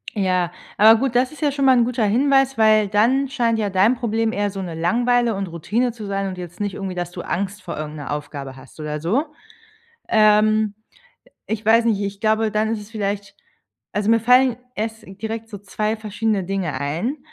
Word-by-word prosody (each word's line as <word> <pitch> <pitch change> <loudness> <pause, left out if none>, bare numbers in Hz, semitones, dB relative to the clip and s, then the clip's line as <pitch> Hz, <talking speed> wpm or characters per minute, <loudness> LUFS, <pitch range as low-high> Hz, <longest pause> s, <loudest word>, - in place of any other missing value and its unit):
Ja, 185 -3 +1 0.3
aber 220 +2 +7
gut, 265 -3 -1
das 250 +2 +2
ist 305 - -13
ja 290 -2 +2
schon 275 -1 -1
mal 260 -1 +6
'n 235 - +5
guter 235 -3 0
Hinweis, 270 +3 +2
weil 215 -1 +4
dann 240 +7 +2
scheint 230 -4 0
ja 205 -2 0
dein 195 +6 +3
Problem 225 -1 -1
eher 205 -1 -1
so 195 0 -6
'ne 175 -3 -5
Langeweile 235 +7 +1
und 195 -1 -3
Routine 215 +9 -1
zu 220 -2 -9
sein 195 0 -2
und 185 -1 -6
jetzt 175 +1 -9
nicht 205 -2 -2
irgendwie, 190 -2 -5
dass 175 0 -4
du 175 - -7
Angst 200 +2 -3
vor 180 - -6
irgend 155 0 -5
'ner 145 0 -6
Aufgabe 140 -2 -6
hast 135 +3 -16
oder 150 0 -4
so. 220 - 0 0.8
Ähm. 215 -1 +4 0.7
Ich 220 -1 -4
weiß 230 +1 +5
nicht 215 -3 +1
ich 200 0 -4
glaube, 220 0 +2
dann 215 +1 +1
ist 215 - -3
es 205 +2 -12
vielleicht 200 -1 -3 0.6
also 205 +1 -1
mir 230 0 +4
fallen 250 +1 +4 0.2
erst 220 +1 -4 0.2
direkt 225 0 -5
so 205 -3 -8
2 215 +2 -2
verschiedene 215 -2 -2
Dinge 175 -8 -3
ein. 170 - -2
215 Hz, 205 wpm, -21 LUFS, 190-230 Hz, 0.8 s, aber